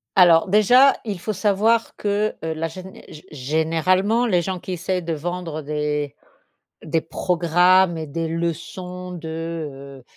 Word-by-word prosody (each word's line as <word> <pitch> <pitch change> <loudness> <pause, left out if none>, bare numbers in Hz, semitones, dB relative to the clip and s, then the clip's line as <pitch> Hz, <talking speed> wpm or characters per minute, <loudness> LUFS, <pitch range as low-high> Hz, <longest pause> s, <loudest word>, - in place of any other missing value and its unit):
Alors 175 -2 +6
déjà, 245 +7 +6
il 200 -4 -4
faut 215 +5 -3
savoir 215 +3 +1
que 210 +1 -1
la 160 0 -2
géné 185 +3 -11
gé 155 - -12
généralement, 165 - +1
les 180 -5 +2
gens 185 0 -3
qui 185 - -6
essaient 180 +1 -2
de 165 -1 -3
vendre 165 0 -4
des 150 -1 -2 0.7
des 160 +1 0
programmes 175 +2 +2
et 160 -1 -5
des 165 +3 -3
leçons 175 +2 -4
de, 160 -5 -6
heu, - - -19
170 Hz, 140 wpm, -22 LUFS, 160-190 Hz, 0.7 s, Alors